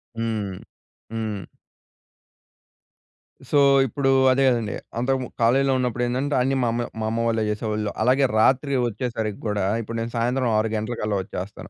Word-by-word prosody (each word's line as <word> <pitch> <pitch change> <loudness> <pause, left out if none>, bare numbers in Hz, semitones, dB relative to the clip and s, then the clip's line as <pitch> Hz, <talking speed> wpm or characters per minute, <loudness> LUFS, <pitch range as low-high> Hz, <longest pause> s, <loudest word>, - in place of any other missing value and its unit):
హ్మ్. 110 -4 -2 0.6
హ్మ్. 110 -3 -3 2.1
సో, 145 - +4 0.3
ఇప్పుడు 135 +2 0 0.2
అదే 135 +1 +3
గదండీ! 115 -5 0 0.2
అంతకుమన్ 130 0 -1
కాలేజీలో 135 +3 +3
ఉన్నప్పుడు 125 -1 -1
ఏందంటే 130 +4 -1
అన్నీ 135 +2 +1
మా 120 - +1
అమ్మే 120 0 -1
మా 110 - -2
అమ్మ 115 +1 -1
వాళ్ళే 110 -1 +1
జేసేవాళ్ళు. 105 0 -2
అలాగే 130 +4 +4
రాత్రి 135 +4 +3
వచ్చేసరికి 110 -2 -3
గూడా 105 -2 0 0.2
ఇప్పుడు 115 +1 -6
నేను 115 +1 -3
సాయంత్రం 125 +2 0
6 110 0 +1
గంటలకల్లా 110 -2 -2
వచ్చేస్తాను. 95 +1 -7
115 Hz, 140 wpm, -23 LUFS, 110-130 Hz, 2.1 s, సో